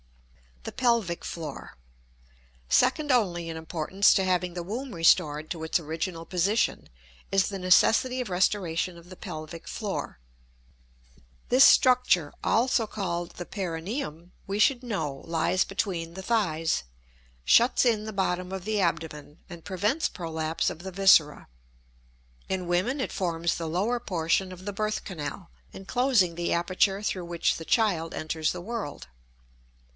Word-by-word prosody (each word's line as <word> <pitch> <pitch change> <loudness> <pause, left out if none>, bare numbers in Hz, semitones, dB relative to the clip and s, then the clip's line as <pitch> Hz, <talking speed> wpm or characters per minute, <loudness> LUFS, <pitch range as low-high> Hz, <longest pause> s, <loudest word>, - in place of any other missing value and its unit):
The - - -6
Pelvic 230 -9 0
Floor. 165 -3 -7 0.9
Second 285 - +3
only 175 -9 +1
in 165 - -5
importance 165 +4 +2
to 195 - +2
having 180 -1 0
the 175 - -4
womb 240 +7 -5
restored 155 -3 +3
to 165 -2 -4
its 160 - +1
original 165 +2 -4
position 195 +6 0 0.4
is 195 -1 +2
the 195 -2 -5
necessity 225 +7 +4
of 245 - -5
restoration 180 -2 0
of 170 +1 -15
the 185 - -10
pelvic 165 -3 -8
floor. 205 - -4 1.3
This 255 +2 +6
structure, 250 - +4
also 230 -1 +2
called 175 -5 -3
the 175 - -6
perineum, 175 - -5 0.2
we 195 +1 -2
should 250 +3 +3
know, 155 - -3
lies 165 +2 +1
between 175 -4 -3
the 190 - -6
thighs, 165 - 0 0.6
shuts 235 - +5
in 220 -3 +2
the 220 - -6
bottom 180 -1 -1
of 190 -1 -5
the 215 -1 0
abdomen, 155 -3 -3
and 170 -2 -10
prevents 210 - 0
prolapse 160 -2 -2
of - - -9
the 190 +2 -7
viscera. 180 -6 +4 1.0
In 185 -2 -2
women 185 +11 0
it 260 - -2
forms 170 -2 -1
the 165 -1 -4
lower 205 +9 0
portion 185 -3 0
of 185 0 -11
the 205 - -4
birth 215 +1 -2
canal, 175 0 -6 0.2
enclosing 215 -3 +1
the 175 0 -1
aperture 185 +3 +1
through 185 -3 -2
which 170 -1 0
the 165 - -8
child 175 -8 +1
enters 155 0 -1
the 180 - -6
world. 215 -6 -6
180 Hz, 145 wpm, -27 LUFS, 165-210 Hz, 1.3 s, This